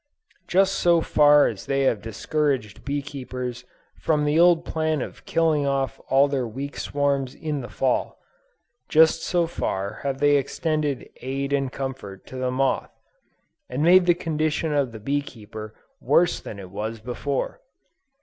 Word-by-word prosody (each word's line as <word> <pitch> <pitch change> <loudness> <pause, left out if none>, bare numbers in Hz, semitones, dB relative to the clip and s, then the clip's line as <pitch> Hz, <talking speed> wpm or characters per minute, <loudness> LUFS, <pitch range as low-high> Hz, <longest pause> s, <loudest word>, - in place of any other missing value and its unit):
Just 195 +1 +2
so 170 -1 +4
far 150 -2 +5
as 105 -4 -4
they 135 0 +1
have 115 -6 +1
discouraged 125 0 -2
bee 145 0 -2
keepers 125 -3 -6 0.3
from 150 -2 +1
the 150 +2 +2
old 170 -1 +5
plan 155 -1 -1
of - - -7
killing 155 -3 +2
off 135 -1 -1
all 135 +1 +5
their 135 -4 -1
weak 135 +6 -6
swarms 140 -2 -1
in 150 -3 -3
the 120 - -8
Fall, 130 -2 -1 0.7
just 160 +1 +5
so 175 -2 +1
far 100 - -3
have 135 -1 -2
they 145 +1 +4
extended 150 0 -1
"aid 135 +2 -3
and 135 -2 0
comfort" 130 -9 -6
to - - -11
the 130 0 -1
moth, 130 +1 0 0.8
and 130 +4 -2
made 180 +2 +6
the 175 - +5
condition 155 -1 -1
of 140 -4 +1
the 110 - -9
bee 140 +6 0
keeper 110 -4 -10 0.3
worse 175 0 +3
than 105 - -8
it 95 -2 -10
was 110 +3 -4
before. 130 - -3
140 Hz, 160 wpm, -24 LUFS, 125-155 Hz, 0.8 s, made